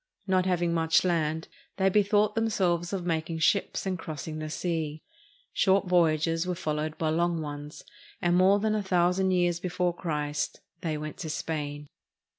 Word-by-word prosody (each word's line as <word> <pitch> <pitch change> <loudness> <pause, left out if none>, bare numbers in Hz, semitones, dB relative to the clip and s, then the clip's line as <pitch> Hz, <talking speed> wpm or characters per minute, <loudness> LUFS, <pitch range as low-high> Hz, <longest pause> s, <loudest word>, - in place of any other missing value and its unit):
Not 185 -1 +2
having 175 -2 +1
much 165 -1 +3
land, 160 -2 0 0.3
they 190 0 +3
bethought 205 +1 +3
them 225 0 +1
selves 175 -4 0
of 190 -3 -3
making 165 -1 -1
ships 185 +6 +1
and 185 -2 -2
crossing 155 0 -6
the 155 0 -4
sea. 160 -2 -3 0.5
Short 195 +1 +3
voy 175 -3 +4
ages 165 +2 -1
were 180 - -1
followed 155 -2 -3
by 160 - 0
long 170 +1 +1
ones, 145 -1 -7 0.4
and 175 0 +2
more 190 +2 +5
than 215 +1 0
a 215 - +1
thou 180 -2 +2
sand 190 +1 +1
years 175 -2 +2
before 180 0 -1
Christ 150 -4 -3 0.2
they 155 -3 -2
went 150 0 -6
to 175 -5 -5
Spain. 150 -2 -4
170 Hz, 175 wpm, -28 LUFS, 155-185 Hz, 0.5 s, more